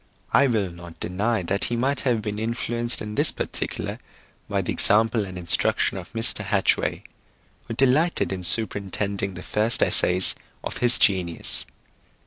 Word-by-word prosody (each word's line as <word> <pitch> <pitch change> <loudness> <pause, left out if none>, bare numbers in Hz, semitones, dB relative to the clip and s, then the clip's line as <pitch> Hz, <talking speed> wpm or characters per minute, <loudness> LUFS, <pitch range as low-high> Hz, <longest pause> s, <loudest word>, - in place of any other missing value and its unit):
I 140 - +5
will 105 -7 -1
not 85 -1 -13
deny 105 +3 -2
that 100 +3 -1
he 120 - -2
might 135 +3 0
have 120 -5 0
been 105 0 -4
influenced 120 +1 0
in 105 0 -7
this - - +3
particular - - -5 0.5
by - - -1
the - - -3
example 110 +1 +2
and 95 -1 -9
instruction 85 -1 0
of - - -9
Mr. 115 -2 +4
Hatchway, 100 -2 0 0.6
who 115 - -5
delighted 135 - +1
in 95 - -5
superintending 100 +1 -1
the 90 - -9
first 110 +3 +3
essays 90 +1 +3 0.3
of - - -5
his 120 0 +4
genius. 90 -5 +1
105 Hz, 150 wpm, -23 LUFS, 95-120 Hz, 0.6 s, I